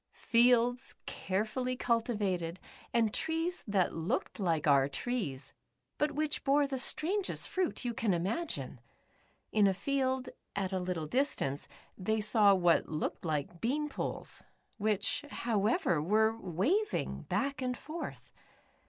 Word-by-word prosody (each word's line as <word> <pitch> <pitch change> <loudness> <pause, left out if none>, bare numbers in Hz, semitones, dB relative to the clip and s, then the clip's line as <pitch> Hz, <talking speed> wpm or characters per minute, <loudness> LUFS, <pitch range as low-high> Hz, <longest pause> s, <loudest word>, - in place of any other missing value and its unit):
Fields 245 +2 +3
carefully 220 +6 -2
culti 235 -1 +1
vated, 180 -4 -1 0.3
and 225 -2 +2
trees 325 +3 0
that 195 -3 +2
looked 165 +6 -2
like 165 -6 +1
our 140 -2 +5
trees, 145 - -3 0.5
but 295 0 +1
which 300 +1 -1
bore 285 +1 +4
the 270 -2 -2
strangest 370 +9 +2
fruit 370 -8 -1
you 240 - -1
can 225 -2 0
imagine. 175 - -2 0.7
In 210 -2 +5
a 190 - +2
field, 260 +2 0 0.3
at 195 -1 -1
a 190 - +1
little 180 -3 -2
distance, 155 - -1 0.3
they 220 +4 0
saw 210 -1 +5
what 175 -2 +3
looked 155 +3 -3
like 155 +2 -2
bean 295 +6 0
poles, - - -4 0.4
which, 210 +4 +1
however, 215 - +1
were 220 +6 +3
waving 230 - 0
back 275 -1 -1
and 250 -1 -1
forth. 320 +3 -7
220 Hz, 130 wpm, -32 LUFS, 180-265 Hz, 0.7 s, our